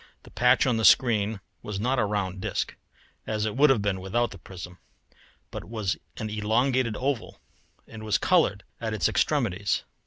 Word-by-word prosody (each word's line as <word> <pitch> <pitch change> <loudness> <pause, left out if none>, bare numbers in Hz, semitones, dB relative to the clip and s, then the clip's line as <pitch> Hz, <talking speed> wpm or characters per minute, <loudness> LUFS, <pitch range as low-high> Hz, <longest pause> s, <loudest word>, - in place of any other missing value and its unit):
The - - -15
patch 125 +3 +4
on 125 -3 +2
the 110 - -1
screen 110 -4 +4 0.2
was 105 -2 -5
not 125 +4 +1
a - - +3
round 100 -3 -2
disk, - - -2 0.5
as 110 -1 -1
it 105 - -2
would 145 +3 +5
have 120 -6 +3
been 95 -2 -1
without 120 +6 0
the 100 - -10
prism, 90 0 -10 0.7
but - - -6
was 110 -3 -2 0.2
an 110 - -3
elongated 115 +2 +1
oval 135 -3 -2 0.5
and 110 -1 -10
was 110 -2 +1
coloured 130 - +2 0.2
at 110 -2 -3
its 105 - +2
extremities. 105 - 0
110 Hz, 175 wpm, -26 LUFS, 100-120 Hz, 0.7 s, would